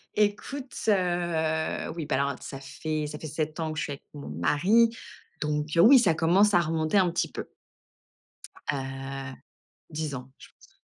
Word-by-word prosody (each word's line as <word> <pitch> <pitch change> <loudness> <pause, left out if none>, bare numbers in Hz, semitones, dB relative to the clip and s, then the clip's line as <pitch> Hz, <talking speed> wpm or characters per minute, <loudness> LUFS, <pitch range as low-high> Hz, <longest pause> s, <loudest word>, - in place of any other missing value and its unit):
Écoute, 215 +6 -1 0.2
heu, 175 -5 0
oui 165 -3 -4
bah - - 0
alors 140 0 0
ça 135 - -7
fait 155 +2 -3
ça 150 0 -7
fait 155 - -6
7 155 +1 -3
ans 160 -1 -1
que 155 - -4
je - - -1
suis 145 - -4
avec 140 - -11
mon 145 - -8
mari, 175 - +3 0.5
donc 150 0 -1
heu, 165 - +6
oui, 260 +6 +9
ça 180 -8 +4
commence 180 +6 +4
à 175 - +6
remonter 160 +2 +1
un 185 -2 +4
petit 170 - -1
peu. - - -6 1.2
Heu, 135 -1 -5 0.6
10 155 -2 -3
ans 125 0 -7
je - - -14
pense. - - -23
155 Hz, 175 wpm, -27 LUFS, 145-175 Hz, 1.2 s, oui